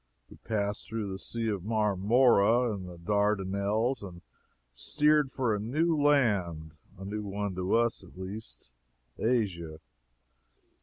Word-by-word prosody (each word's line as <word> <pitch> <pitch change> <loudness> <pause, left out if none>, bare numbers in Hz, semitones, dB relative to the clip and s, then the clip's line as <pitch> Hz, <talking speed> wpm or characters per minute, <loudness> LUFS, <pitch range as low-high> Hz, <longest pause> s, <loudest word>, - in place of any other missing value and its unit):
We - - -13
passed 105 -1 -3
through 110 -3 -3
the 95 - -5
Sea 115 +2 -3
of 100 -4 -3
Marmora 110 +2 +3
and 95 -3 -6
the 90 - -10
Dardanelles, 100 +5 0
and 90 -3 -10 0.5
steered 150 - +2
for 125 -4 0
a 105 - -1
new 155 +10 +1
land 105 - +2 0.3
a 95 - -8
new 105 +2 -4
one 100 0 -3
to 90 +2 0
us, 115 -3 +1
at 90 - -16
least 95 - -8 0.5
Asia. 90 -10 -1
105 Hz, 135 wpm, -29 LUFS, 95-115 Hz, 0.5 s, Marmora